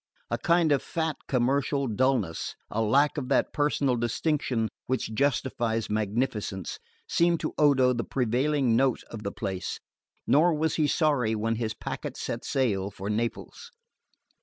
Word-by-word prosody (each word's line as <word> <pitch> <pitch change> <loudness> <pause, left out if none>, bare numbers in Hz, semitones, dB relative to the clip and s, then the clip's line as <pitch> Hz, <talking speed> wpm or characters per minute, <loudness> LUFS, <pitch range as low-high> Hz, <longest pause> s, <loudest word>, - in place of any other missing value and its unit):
A - - 0
kind 170 -2 +3
of 140 - +3
fat 160 -2 -2
commercial 135 +2 +1
dulness, 115 -7 0 0.2
a 110 - 0
lack 140 +8 +3
of 130 -2 -6
that 140 - +2
personal 145 -3 +1
distinction 120 0 0 0.2
which 130 -3 -1
justifies 120 -4 0
magnificence, 105 -3 -2 0.3
seemed 170 -1 +2
to - - -3
Odo 135 -4 +5
the 120 -1 -2
prevailing 130 +1 +1
note 130 0 +2
of 115 - -6
the 100 - -3
place; 95 -3 -4 0.5
nor 160 +3 +4
was 160 +1 0
he 155 -2 +3
sorry 140 -9 +2
when 115 +1 -1
his 110 -2 -2
packet - - -5
set - - -4
sail 100 -8 0
for 100 0 -5
Naples. 115 - -3
125 Hz, 145 wpm, -27 LUFS, 110-145 Hz, 0.5 s, Odo